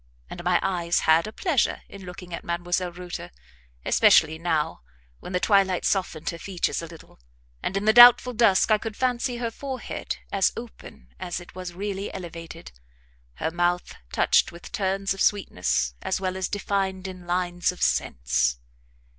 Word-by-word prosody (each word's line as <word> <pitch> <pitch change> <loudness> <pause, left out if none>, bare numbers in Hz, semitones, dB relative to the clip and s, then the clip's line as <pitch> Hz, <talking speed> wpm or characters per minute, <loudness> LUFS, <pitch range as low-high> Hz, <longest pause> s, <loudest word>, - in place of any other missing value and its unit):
And - - -7
my - - +3
eyes 175 -2 0
had 160 +4 +4
a - - -6
pleasure 295 - 0
in 200 -2 -11
looking 180 -1 -9
at - - -5
Mdlle. 175 +1 -2
Reuter, 175 - -7 0.6
especially 160 +1 +4
now, 160 - -1 0.4
when - - -9
the 180 - 0
twilight 195 -3 +2
softened 170 -5 -1
her 170 - -9
features 185 -3 -2
a 165 - -7
little, 165 - -15 0.4
and, 195 - -2
in 200 - -2
the 220 - +5
doubtful 245 +1 +9
dusk, 220 -3 +4
I 215 - +5
could 220 -2 -6
fancy 250 -1 0
her 235 -1 -3
forehead 265 +2 -5
as 195 -1 +2
open 225 - -11
as 175 - -4
it 175 - -13
was 180 -1 -7
really 200 +1 -4
elevated, 165 - -8 0.6
her 160 - -2
mouth 175 +1 0 0.2
touched - - +3
with 170 0 -12
turns 195 0 -1
of 195 - -7
sweetness 90 - +1
as 190 - -1
well 185 -1 -2
as 190 -1 -2
defined 195 -2 -2
in 180 -2 -10
lines 175 0 0
of 180 - -5
sense. - - +1
185 Hz, 165 wpm, -25 LUFS, 170-200 Hz, 0.6 s, doubtful